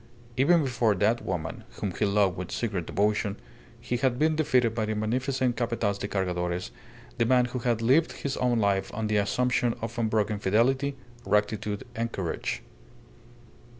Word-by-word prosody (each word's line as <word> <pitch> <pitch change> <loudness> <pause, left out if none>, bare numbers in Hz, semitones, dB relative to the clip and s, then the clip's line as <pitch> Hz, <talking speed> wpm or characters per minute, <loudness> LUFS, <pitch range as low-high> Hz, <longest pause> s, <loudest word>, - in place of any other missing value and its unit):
Even 160 +5 +4
before 120 -5 +1
that 115 +5 +1
woman, 80 -3 -4
whom 100 - -3
he 105 - 0
loved 100 -2 +2
with 90 0 -5
secret 100 -8 -2
devotion, 105 0 0 0.4
he 120 - -2
had 125 -1 +1
been 155 +3 +2
defeated 125 -7 +2
by 115 -1 -1
the 110 0 -2
magnificent 125 +3 0
Capataz 115 -4 -1
de - - -3
Cargadores, 90 -2 -2 0.5
the 115 - +4
man 125 0 +4
who 125 +1 -4
had 120 -2 0
lived 140 +8 +3
his 140 -1 -3
own 125 -1 +2
life 100 -3 +1
on 110 0 -2
the 105 0 +1
assumption 120 +4 +1
of 115 +1 -5
unbroken 110 -2 +1
fidelity, 130 +8 +2 0.3
rectitude, 105 -1 0
and 115 0 -2
courage! 90 -6 -3
115 Hz, 160 wpm, -27 LUFS, 100-125 Hz, 0.5 s, Even